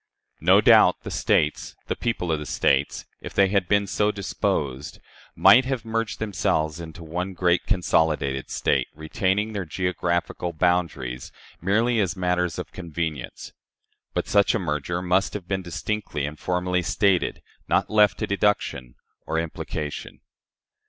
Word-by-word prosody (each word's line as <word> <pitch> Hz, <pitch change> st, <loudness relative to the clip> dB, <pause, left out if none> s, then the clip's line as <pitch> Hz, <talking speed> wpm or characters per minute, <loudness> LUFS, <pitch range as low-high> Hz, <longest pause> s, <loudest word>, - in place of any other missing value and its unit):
No -, -, +5 dB
doubt, -, -, +6 dB
the -, -, -6 dB
States 75 Hz, -, 0 dB
the -, -, -2 dB
people 115 Hz, -8 st, -2 dB
of 80 Hz, -, 0 dB
the 75 Hz, -, -6 dB
States 70 Hz, +1 st, +1 dB, 0.2 s
if -, -, -8 dB
they 100 Hz, -1 st, +4 dB
had 95 Hz, -2 st, +1 dB
been 100 Hz, 0 st, +3 dB
so 105 Hz, +2 st, +1 dB
disposed, 75 Hz, -8 st, -2 dB, 0.4 s
might 130 Hz, -, +7 dB
have 130 Hz, -3 st, -3 dB
merged 115 Hz, 0 st, -2 dB
themselves 80 Hz, -7 st, -1 dB
into 85 Hz, +1 st, -9 dB
one 90 Hz, +4 st, -4 dB
great 90 Hz, 0 st, +1 dB
consolidated 75 Hz, -7 st, +1 dB
State, -, -, +1 dB
retaining 95 Hz, +7 st, -1 dB
their 100 Hz, -2 st, -2 dB
geographical 85 Hz, 0 st, -2 dB
boundaries 80 Hz, -8 st, -1 dB, 0.3 s
merely 115 Hz, +6 st, +2 dB
as 95 Hz, -1 st, 0 dB
matters 90 Hz, -1 st, 0 dB
of -, -, -6 dB
convenience. 80 Hz, -5 st, -5 dB, 0.6 s
But -, -, -1 dB
such 100 Hz, +1 st, +3 dB
a -, -, +1 dB
merger 85 Hz, +1 st, -2 dB
must 90 Hz, +3 st, +1 dB
have 95 Hz, -4 st, -6 dB
been 95 Hz, -1 st, -1 dB
distinctly 85 Hz, -2 st, -3 dB
and 75 Hz, +1 st, -7 dB
formally 90 Hz, 0 st, 0 dB
stated, 95 Hz, +1 st, +1 dB, 0.2 s
not -, -, +1 dB
left 105 Hz, -1 st, +4 dB
to -, -, -1 dB
deduction 100 Hz, -11 st, -1 dB, 0.3 s
or 80 Hz, -, -1 dB
implication. 80 Hz, -2 st, -5 dB
90 Hz, 145 wpm, -24 LUFS, 80-100 Hz, 0.6 s, might